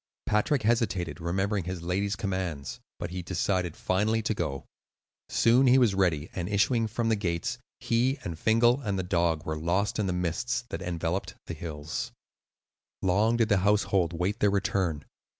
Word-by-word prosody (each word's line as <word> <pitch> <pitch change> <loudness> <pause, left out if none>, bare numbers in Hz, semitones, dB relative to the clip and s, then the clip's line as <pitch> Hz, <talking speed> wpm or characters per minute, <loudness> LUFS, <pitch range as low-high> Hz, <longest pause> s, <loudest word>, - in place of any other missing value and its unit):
Patrick 105 +6 +1
hesitated, 100 - 0
remembering 95 +3 -1
his 90 -2 -5
lady's 100 +3 0
commands, 95 -8 -3 0.2
but 85 - -5
he 90 0 -4
decided 90 -1 -1
finally 110 +4 +1
to 110 - 0
go. 75 -9 -3 0.6
Soon 125 +3 +4
he 125 +1 +6
was 120 -6 +4
ready, 85 -6 +1
and 90 0 -3
issuing 110 +3 +2
from 115 +1 -1
the 110 - +3
gates, 100 +4 -2 0.2
he 125 +4 +1
and 80 -2 -5
Fingal 120 +5 +4
and 100 -6 -2
the 95 - -1
dog 85 -3 0
were 80 - -2
lost 90 +7 0
in 105 - +1
the - - 0
mists 90 +9 -1
that - - -5
enveloped 85 +2 -2
the - - -5
hills. 80 -1 -5 0.9
Long 105 +5 +3
did 115 -2 +2
the 100 - +4
household 95 -3 +2
wait 90 +5 -1
their 105 - +4
return. 95 -6 0
95 Hz, 170 wpm, -28 LUFS, 85-110 Hz, 0.9 s, he